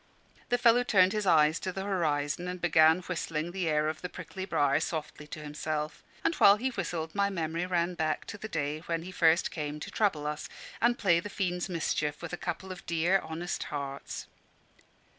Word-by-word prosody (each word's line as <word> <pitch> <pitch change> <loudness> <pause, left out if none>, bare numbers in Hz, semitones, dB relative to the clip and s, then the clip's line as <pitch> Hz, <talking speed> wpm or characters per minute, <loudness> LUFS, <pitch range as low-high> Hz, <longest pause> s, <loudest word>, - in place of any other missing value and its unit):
The 245 - +3
fellow 240 0 +5
turned 190 -5 +4
his 210 -2 -1
eyes 155 -1 +5
to 185 - -3
the 190 +1 -4
horizon, 165 -4 0
and 180 0 -4
began 160 0 +5
whistling 165 -2 -3
the 180 -2 -1
air 150 0 +2
of 155 0 -3
"The 180 - -4
Prickly 185 +2 -7
Briar" 145 -5 +2
softly 155 -2 -4
to 155 - -7
himself. 150 0 -3 0.2
And 330 - +2
while 200 - +8
he 255 +5 -1
whistled, 170 -7 -3
my 200 0 +2
memory 170 -1 -2
ran 175 -1 +1
back 160 -2 -1
to 205 - -9
the 220 - -5
day 150 -3 -2
when 165 -1 -1
he 185 - -7
first 165 -1 +3
came 150 -1 -4
to - - -7
trouble 180 -9 +1
us, 150 0 -4 0.3
and 240 +1 +3
play 175 -5 +3
the 205 - -6
fiend's 180 -2 -2
mischief 155 -3 -1
with 170 - -6
a - - -2
couple 190 +1 -4
of 185 - -8
dear 170 +3 +3
honest 165 +2 -4
hearts. 140 -1 -5
170 Hz, 200 wpm, -30 LUFS, 155-185 Hz, 0.3 s, while